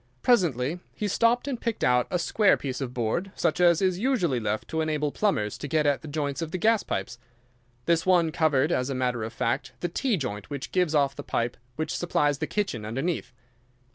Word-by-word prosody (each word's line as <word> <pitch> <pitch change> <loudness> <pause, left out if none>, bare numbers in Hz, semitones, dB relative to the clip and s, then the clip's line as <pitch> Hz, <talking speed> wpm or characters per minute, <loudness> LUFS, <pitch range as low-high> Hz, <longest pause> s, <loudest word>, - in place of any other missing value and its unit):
Presently 170 - +2 0.2
he 210 - -2
stopped 230 +6 +2
and 255 -4 -3
picked 230 -2 -2
out 125 -1 +3
a 180 - 0
square 200 +4 +3
piece 130 -1 -4
of 130 -2 -3
board, 125 - -2
such - - 0
as 175 0 +4
is 185 -1 +1
usually 200 - +1
left 110 0 -2
to 160 - -1
enable 150 -2 0
plumbers 125 - 0
to 145 - -5
get 155 +1 +1
at 145 -1 +2
the 160 - -9
joints 145 0 -2
of 165 - -3
the 185 - -3
gas 220 +4 +3
pipes. 120 -1 -4 0.7
This 165 -1 +2
one 175 -3 +3
covered, 155 -1 +2
as 125 -4 0
a 135 - -2
matter 125 -2 -1
of 110 - -4
fact, 115 0 -2
the 175 - -2
T 235 +4 0
joint 105 - -5
which 140 -2 -5
gives 180 -4 +1
off 140 -2 +2
the - - -6
pipe 120 +1 -2 0.2
which 155 0 -2
supplies 145 -5 +1
the 155 - -2
kitchen 195 - -2
underneath. 135 +9 -2
155 Hz, 210 wpm, -26 LUFS, 130-180 Hz, 0.7 s, as